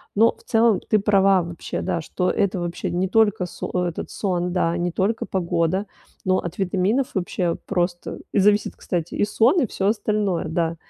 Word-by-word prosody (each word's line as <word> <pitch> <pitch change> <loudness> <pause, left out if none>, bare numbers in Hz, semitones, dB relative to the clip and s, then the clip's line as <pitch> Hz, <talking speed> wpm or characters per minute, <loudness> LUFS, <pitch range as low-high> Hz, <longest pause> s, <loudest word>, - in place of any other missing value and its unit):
Но 225 +3 +4
в - - -23
целом 225 -2 +3
ты 215 - +3
права 195 -2 +4
вообще, 170 0 -5
да, 170 - -1
что 180 +3 -1
это 195 -2 0
вообще 175 0 -3
не 180 +2 0
только 205 -2 +2
со - - -6 0.2
этот, 170 - -5
сон, 180 -3 -1
да, 170 -2 +1
не 175 0 -1
только 200 +6 0
погода, 185 +1 0 0.4
но 185 0 +3
от 175 +2 -6
витаминов 195 +7 +1
вообще 180 -2 -1
просто 175 0 -2
зависит, 205 +1 +3
кстати, 175 -2 -3
и - - +2
сон, 240 - +3
и - - +3
всё 195 -1 -2
остальное, 210 -4 0
да, 165 +1 -1
190 Hz, 175 wpm, -23 LUFS, 175-210 Hz, 0.4 s, Но